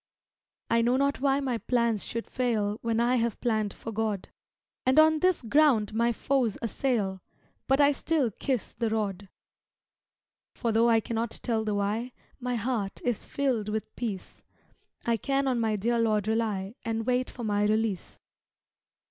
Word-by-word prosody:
I 230 - +4
know 245 +2 +3
not 280 0 +1
why 275 0 +3
my 255 -4 -1
plans 235 -4 +1
should 230 0 -4
fail 220 -4 -1
When 230 -1 0
I 245 +2 +3
have 235 -1 -1
plan'd 215 -4 0
for 225 - -7
God, 215 -3 -2 0.5
And 260 +2 +2
on 315 0 +6
this 365 -3 +2
ground 235 -5 +3
my 235 +2 +2
foes 245 -2 0
assail, 220 -5 -1 0.5
But 270 +1 +3
I 285 0 +6
still 285 -3 0
kiss 255 +3 -2
the 230 -1 -1
rod, 205 -3 -2 1.3
For 235 - -1
tho' 230 +2 +4
I 225 -1 +4
cannot 230 +1 -3
tell 225 -3 0
the 210 -1 -1
why 215 +5 -1 0.3
My 250 -1 -2
heart 225 -4 -2
is 245 -4 -1
filled 250 -7 -1
with 215 0 -4
peace; 210 -6 -5 0.6
I 235 -1 +2
can 275 +4 0
on 250 -2 +1
my 220 -2 +1
dear 235 +4 0
Lord 215 -2 +1
rely, 215 -3 -1
And 225 -1 -2
wait 250 0 +1
for 240 - -8
my 205 -1 +1
release. 215 -3 -1
230 Hz, 165 wpm, -28 LUFS, 215-255 Hz, 1.3 s, on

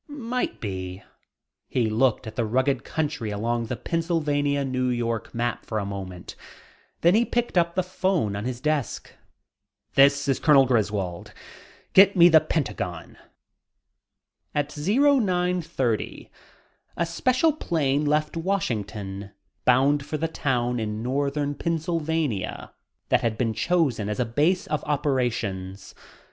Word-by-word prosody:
"Might 250 -4 -3
be." 95 -3 -5 0.7
He 120 -3 +1
looked 115 +3 +1
at 110 0 -8
the 120 - 0
rugged 130 +2 +1
country 145 -8 -3
along 115 +3 -1
the - - -3
Pennsylvania, 145 -4 0
New 130 -1 -1
York 115 -2 -2
map 120 0 -2
for 110 - -4
a 100 - -1
moment, 95 -3 -7 0.7
then 170 +2 +5
he 225 +3 +4
picked 240 -2 -2
up 170 -1 +2
the 185 - +1
phone 185 - 0
on 100 - -4
his 125 -1 -3
desk. 150 -3 -2 0.8
"This 140 0 +4
is 135 - +1
Colonel 145 -4 +6
Griswold. 105 -7 -1 0.6
Get 195 +1 +7
me 175 -1 +8
the 160 -2 +7
Pentagon." 105 - -3 1.4
At 145 0 -1
0930 180 - +1 0.7
a 170 - +1
special 255 - +2
plane 150 - 0
left 150 +1 0
Washington, 105 - -3 0.4
bound 135 +3 +4
for 155 - -4
the 165 +2 -1
town 125 -6 -1
in 110 0 -3
northern 140 +3 -1
Pennsylvania 160 - -2 0.4
that - - +3
had 115 -2 -1
been 115 -2 0
chosen 130 - 0
as 105 - -3
a 125 - +2
base 155 - +1
of 150 - -2
operations. 120 -10 -2
140 Hz, 130 wpm, -25 LUFS, 115-165 Hz, 1.4 s, me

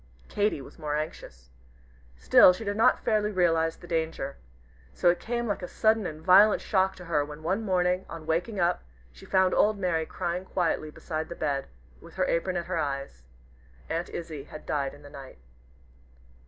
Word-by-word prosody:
Katy 205 -7 0
was 135 - -14
more 150 -2 -2
anxious. 60 - -7 0.7
Still - - +7
she 185 - -7
did 205 -1 -2
not 220 - +3
fairly 215 -1 +1
realize 165 -4 +2
the - - -13
danger. 160 -5 -3 0.6
So 175 - +3
it 175 - -4
came 235 0 -2
like 205 -3 -2
a 180 - -5
sudden 220 -1 +2
and 155 0 -8
violent 205 +3 +6
shock 190 -2 +1
to 180 - -11
her, 155 -3 +1
when, 150 +1 -9
one 190 +6 0
morning 180 -2 0
on 160 -1 -8
waking 175 +6 -1
up, 175 0 +1 0.3
she 65 - -15
found 190 -1 +3
old 215 0 +3
Mary 170 -4 -1
crying 175 +2 -3
quietly 170 -4 -1
beside 155 +1 -5
the 170 - -6
bed, 140 -4 -2 0.3
with - - -14
her - - +1
apron 180 +2 0
at 170 - -3
her 180 -2 -2
eyes. 140 - -4 0.7
Aunt 165 +1 -2
Izzie 160 -5 -6
had 155 - -11
died 140 -2 -2
in 145 - -17
the 145 - -11
night! 135 -1 -11
170 Hz, 185 wpm, -27 LUFS, 155-190 Hz, 0.7 s, Still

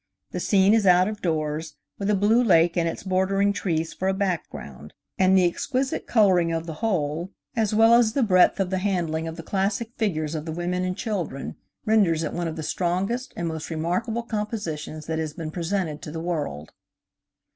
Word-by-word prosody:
The - - -3
scene 195 0 +4
is 220 -3 +3
out 180 +1 +6
of 210 -1 -5
doors, 155 -2 -2 0.2
with 200 0 -1
a 210 - +4
blue 215 +5 +3
lake 170 -6 +4
and 170 -1 +1
its - - -6
bordering 195 +2 +1
trees 165 -4 -2
for 190 - -3
a 190 - +1
background, 160 - -4 0.2
and 190 0 +5
the 185 - +5
exquisite 260 +9 -1
coloring 185 -7 +4
of 165 0 -2
the 165 - -5
whole, 170 -5 -1 0.3
as 220 -2 +1
well 225 +1 +6
as 235 -2 +5
the 275 - +2
breadth 185 -2 +4
of 190 -1 0
the 190 - 0
handling 170 -5 -1
of 160 - -5
the 165 - -7
classic 200 +5 -1
figures 160 -9 -1
of 155 -1 -4
the 160 - -4
women 175 +2 -2
and 185 0 -2
children, 175 - -4 0.3
renders 195 -8 +3
it 155 - -3
one 175 -1 -2
of 160 - -4
the 160 - -5
strongest 185 - -1
and 170 - -2
most 160 -2 -5
remarkable 180 +9 -2
compositions 205 -9 -4
that 160 0 -2
has 155 -2 -3
been 160 -2 -6
presented 170 -3 -2
to 150 - -7
the 160 +2 -5
world. 155 - -4
180 Hz, 200 wpm, -25 LUFS, 160-205 Hz, 0.3 s, out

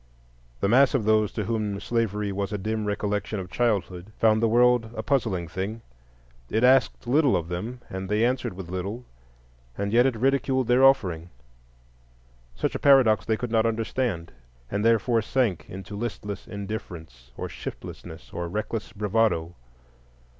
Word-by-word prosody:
The - - +2
mass 130 +5 +5
of 115 -6 0
those 110 -1 +3
to - - -2
whom 105 -3 -2
slavery 105 -2 -1
was 100 0 -3
a 105 - -1
dim 110 +2 -2
recollection 105 0 -2
of 90 -1 -7
childhood 100 -5 -1
found 110 -1 +3
the 115 - +4
world 120 0 +4
a 110 - -4
puzzling 110 - 0
thing: 100 +7 -5 0.7
it 110 +2 0
asked 130 0 +4
little 135 -1 +3
of 85 -1 -5
them, 110 +8 -5
and 95 0 -6
they 105 +2 +2
answered 125 -4 -1
with 90 -1 -8
little, 100 +7 -4 0.7
and 100 +1 -2
yet 120 +2 +5
it 130 - -1
ridiculed 130 +1 +1
their 125 +2 +4
offering. 90 -11 +3 1.3
Such - - -1
a - - -3
paradox 120 -8 +5
they 110 - +1
could 125 -1 -4
not 115 0 +3
understand, 110 -6 -2 0.4
and 105 - -1
therefore 115 +1 +3
sank 110 -6 -1
into 95 +2 -8
listless 105 -2 -5
indifference, 85 - -7
or - - -4
shiftlessness, - - -9
or 85 -1 -4
reckless 105 +3 -4
bravado. 105 -5 0
110 Hz, 155 wpm, -26 LUFS, 95-120 Hz, 1.3 s, mass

